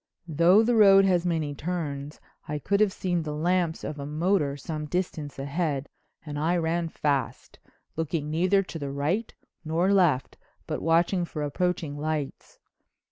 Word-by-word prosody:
Though 170 +7 +5
the 240 +1 +2
road 195 -2 +7
has 180 -2 +2
many 160 -4 -1
turns 145 -3 -4 0.3
I 150 - -2
could 200 +7 0
have 210 -2 +4
seen 180 -2 -1
the 150 -1 -4
lamps 170 +1 0
of 150 - -5
a 140 - -5
motor 150 -2 0
some 150 +1 -5
distance 160 -4 -3
ahead 145 0 -2 0.4
and 145 -1 -5
I 170 +4 +1
ran 165 0 -1
fast, 140 -6 -2 0.4
looking 155 -1 -2
neither 185 +5 +2
to 170 -3 -8
the 140 -2 -4
right 150 +11 -1 0.3
nor 170 +5 +1
left 170 -9 +2 0.3
but - - -4
watching 170 +3 +2
for 155 -3 -4
approaching 155 -1 -2
lights. 150 -2 -4
160 Hz, 155 wpm, -26 LUFS, 145-180 Hz, 0.4 s, road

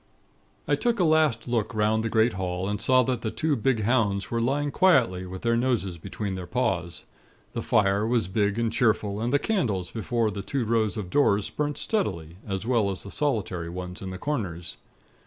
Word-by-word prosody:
"I - - +2
took 240 -2 +1
a - - +4
last 155 -8 +3
look 115 -2 -1
'round 110 +1 +2
the 115 - -1
great 110 +1 +3
hall, 90 0 -3
and 105 +1 -2
saw 130 +2 +4
that 125 -1 -1
the 110 - -2
two 130 +8 0
big 115 -2 +1
hounds 100 -4 +1
were 115 0 0
lying 140 +4 0
quietly, 120 - +3
with 95 0 -8
their 115 0 +2
noses 115 -8 0
between 100 +4 -4
their 90 -2 -5
paws. 90 -7 -1 0.5
The - - -2
fire 100 0 +2
was 115 -6 +1
big 100 +2 0
and 115 -1 0
cheerful, 105 -4 +1
and 120 +2 0
the 145 - +4
candles 120 - -1
before 115 0 -1
the 100 - -5
two 125 +4 -2
rows 110 -1 +1
of 95 -4 -5
doors, 105 -8 +2
burnt 150 -1 -2
steadily, 85 - -2
as 95 +1 -3
well 115 -5 +2
as 95 - -4
the 100 - -9
solitary 105 - -1
ones 90 +1 -6
in 95 - -5
the 95 - -6
corners. 90 - -4
110 Hz, 200 wpm, -26 LUFS, 95-125 Hz, 0.5 s, a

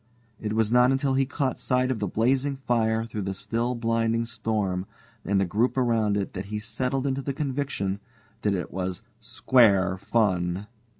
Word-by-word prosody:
It 105 -1 -3
was 110 0 +1
not 125 +1 +5
until 135 0 +1
he 135 0 +2
caught 135 -1 -1
sight 130 0 +1
of 120 - -2
the 100 - -1
blazing 130 +7 +1
fire 115 -4 0
through 110 -2 -5
the 95 0 -3
still 115 +5 -1
blinding 115 0 0
storm 105 -5 -2 0.4
and 100 0 +1
the 95 - +2
group 110 +9 0
around 115 -5 +2
it 100 - -3
that 95 0 -5
he 105 +1 -4
settled 125 +5 -2
to 135 - -3
the 140 +1 -3
conviction 135 -9 -2 0.4
that 105 -2 +1
it 90 - -4
was 90 +2 -3 0.2
"square 105 -6 +3
fun." 95 -3 0
115 Hz, 175 wpm, -26 LUFS, 100-125 Hz, 0.4 s, not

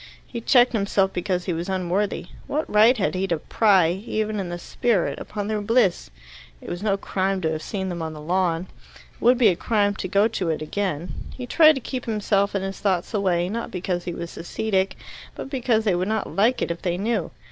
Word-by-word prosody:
He 235 - -6
checked 245 +1 +4
himself 200 -2 +1
because 180 0 -1
he 180 - -1
was 170 +3 -4
unworthy. 190 +2 -1 0.2
What 305 +2 -1
right 220 +4 +5
had 200 - 0
he 190 +1 -1
to 170 -3 0
pry, 190 0 +3
even 215 +2 -2
in 185 -3 -3
the 175 - -4
spirit, 210 +1 0
upon 205 -1 -5
their 215 -1 -1
bliss? 210 - +2 0.5
It - - -10
was 175 - -4
no 200 -2 +1
crime 195 0 -1
to 160 -2 0
have 155 -1 -3
seen 190 0 -3
them 175 -2 -4
on 160 -1 -4
the 155 - -9
lawn. 175 +1 0 0.5
It - - -26
would 245 +1 +5
be 235 -4 +6
a 180 - +1
crime 205 +2 +1
to - - -3
go 200 +3 +3
to 195 -6 -2
it 160 - 0
again. 175 -1 -3 0.2
He 250 - -6
tried 310 +4 +6
to 270 - -4
keep 255 +1 -5
himself 205 -2 +1
and 195 -1 -1
his 195 0 -5
thoughts 190 0 0
away, 180 -4 +1
not 230 +5 -4
because 180 -1 -3
he 175 - -3
was 170 - -7
ascetic, 195 +2 -1 0.4
but 270 - -7
because 240 -5 +1
they 205 -4 +2
would 180 +2 0
not 220 -1 -2
like 230 +6 +3
it - - -2
if 170 - -5
they 175 -1 -1
knew. 205 -2 -1
195 Hz, 225 wpm, -24 LUFS, 180-220 Hz, 0.5 s, be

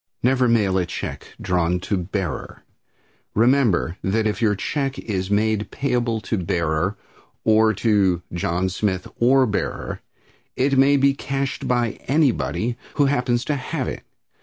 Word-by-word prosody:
Never 125 0 +3
mail 105 -5 +2
a 90 - -1
check - - -6
drawn 90 -1 0
to 100 - -1
"Bearer." 90 -1 -4 0.7
Remember 115 - +3
that 110 +3 +1
if 105 +2 -1
your 105 -3 +3
check 135 +6 -2
is 95 -3 -3
made 105 +1 +1
payable 120 -4 -1
to 110 -2 -2
"Bearer" 85 +2 -1 0.5
or 110 0 +4
to 95 -5 +2
"John 85 +1 0
Smith 95 -1 -2
or 130 +2 +5
Bearer" 105 -4 -3 0.5
it 135 +2 +2
may 135 +2 +5
be 140 0 +4
cashed 135 0 -3
by 120 -2 0
anybody 125 -4 +1 0.2
who 145 - +3
happens 125 -3 +1
to 150 - 0
have 135 0 -3
it. - - -5
110 Hz, 140 wpm, -22 LUFS, 95-130 Hz, 0.7 s, or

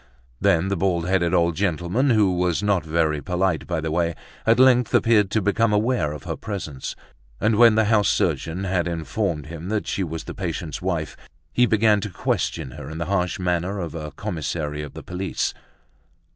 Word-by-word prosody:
Then 85 +3 +2
the 100 - 0
bald 90 -2 0
headed 90 -2 +2
old 85 -2 +2
gentleman, 95 - 0
who 105 -6 +3
was 90 +2 0
not 100 -3 +2
very 80 -2 0
polite 90 -1 -1
by 85 -2 -1
the 80 0 -3
way, 85 0 0 0.3
at 115 +2 +5
length 125 -3 +5
appeared 105 -4 +4
to 105 0 0
become 110 +3 +2
aware 105 - +1
of 75 -3 -8
her - - -4
presence; 80 -10 -5 0.4
and 105 +1 +2
when 115 0 +7
the 110 0 +3
house 105 -1 +3
surgeon 80 +3 0
had 95 -2 0
informed 80 -2 -2
him 85 +3 -7
that 105 -1 -1
she 95 - -1
was 80 -2 -5
the - - -7
patient's 85 -4 -4
wife, 85 -4 -2 0.4
he 125 0 +4
began 110 -2 +3
to 105 - -4
question 65 -6 -2
her 65 - -8
in 80 - -7
the 85 - -2
harsh 90 -2 0
manner 90 +2 -1
of 85 -5 -4
a 75 -2 -5
commissary 80 -5 -3
of 75 - -8
the - - -8
police. 90 +1 -2
90 Hz, 190 wpm, -23 LUFS, 80-105 Hz, 0.4 s, when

